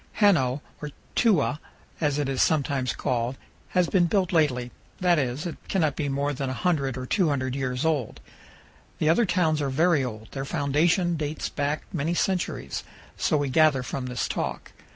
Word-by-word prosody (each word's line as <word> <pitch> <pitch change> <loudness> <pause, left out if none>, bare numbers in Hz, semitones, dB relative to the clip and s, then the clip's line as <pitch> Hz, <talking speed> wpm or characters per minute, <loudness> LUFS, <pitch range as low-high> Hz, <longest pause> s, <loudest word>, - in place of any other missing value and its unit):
Hano, 150 - +3 0.2
or 150 - -4 0.3
"Tewa" 175 - +3 0.4
as 145 -2 +1
it 145 -2 0
is 135 -1 0
sometimes 140 -5 +1
called, 125 0 -1 0.3
has 180 -2 +2
been 175 -1 +3
built 190 0 +1
lately; 125 -7 +2 0.3
that 175 -3 +3
is, 130 +3 -2
it 170 - -4
cannot 155 -7 +1
be 145 -2 -2
more 140 +1 0
than 135 0 -3
100 135 -1 0
or 130 - -4
200 135 -6 +1
years 130 0 -2
old. 150 -8 0 0.8
The 155 - +1
other 205 +7 +4
towns 160 -4 +2
are 140 - 0
very 155 +1 +3
old; 110 -3 -6
their 135 - -4
foundation 165 +6 +1
dates 150 0 -3
back 145 +1 -2
many 165 +1 -1
centuries 185 0 -1 0.3
so 155 - +1
we 145 -1 -1
gather 145 -2 +4
from 130 0 -4
this 125 0 -2
talk. - - -4
145 Hz, 170 wpm, -26 LUFS, 130-170 Hz, 0.8 s, other